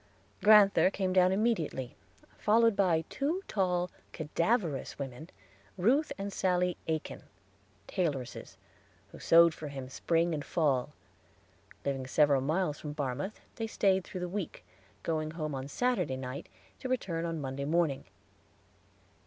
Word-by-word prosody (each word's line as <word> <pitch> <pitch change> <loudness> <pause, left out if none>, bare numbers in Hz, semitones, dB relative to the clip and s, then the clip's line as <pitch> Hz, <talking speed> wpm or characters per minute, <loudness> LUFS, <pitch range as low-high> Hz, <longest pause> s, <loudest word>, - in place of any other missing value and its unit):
Grand'ther 205 -3 +7
came 190 -1 -1
down 185 0 +5
immediately 190 - -1 0.4
followed 230 0 +4
by 175 -5 +2
two 325 +8 -2
tall, 180 -3 0 0.2
cadaverous 165 - -1
women, 140 +4 -7 0.5
Ruth 260 - +2
and 200 0 -4
Sally 180 -2 +1
Aikin, 160 -1 -3 0.7
tailoresses, 145 - -3 0.5
who - - -11
sewed 170 0 +6
for 155 - -7
him 135 -2 -7
spring 165 +4 +1
and 150 -2 -3
fall. 145 -4 0 0.9
Living 135 -2 -2
several 140 -1 +4
miles 155 +2 0
from 150 -1 -6
Barmouth, 145 +8 -3 0.2
they 225 - -2
stayed 190 -3 +2
through 185 0 -7
the 180 - -2
week, 190 0 -5 0.4
going 155 -1 -1
home 155 -2 -4
on 135 0 -4
Saturday 240 - 0
night, 130 +3 -6 0.3
to 260 - -5
return 185 -10 -1
on 165 -1 -2
Monday 135 0 -4
morning. 155 -3 +1
170 Hz, 130 wpm, -31 LUFS, 145-195 Hz, 0.9 s, Grand'ther